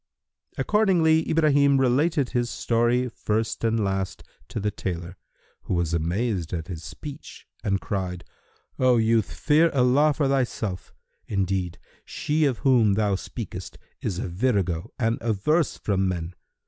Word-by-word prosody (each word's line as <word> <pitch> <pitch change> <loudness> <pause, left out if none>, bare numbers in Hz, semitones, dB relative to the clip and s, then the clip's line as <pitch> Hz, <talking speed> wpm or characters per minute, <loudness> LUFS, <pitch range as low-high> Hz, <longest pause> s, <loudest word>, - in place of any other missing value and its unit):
Accordingly 170 -7 +3
Ibrahim 145 -3 +4
related 140 +3 +2
his 120 -1 0
story 120 +2 +1
first 110 -1 -2
and 115 0 +2
last 95 -1 -2 0.2
to - - -4
the 105 +1 -1
tailor, 85 -3 -5 0.5
who - - -1
was 85 -1 0
amazed 85 +2 -1
at 85 +1 -4
his 85 -3 -6
speech 145 - -9 0.2
and 100 -3 +1
cried, 90 -4 -3 0.6
"O 125 -1 +4
youth, 110 -1 +2
fear 155 +2 +3
Allah 135 +4 +4
for 145 -2 0
thyself 120 -8 -1 0.4
:[FN#313] - - -3
indeed 95 -2 -1 0.3
she 150 +1 0
of 130 -5 +1
whom 120 -6 +5
thou 105 -1 +1
speakest 95 - -6 0.2
is 90 - -2
a - - -3
virago 95 -2 -1
and 115 -1 0
averse 120 - +1
from 95 -2 0
men. 85 -1 -3
115 Hz, 140 wpm, -25 LUFS, 95-135 Hz, 0.6 s, whom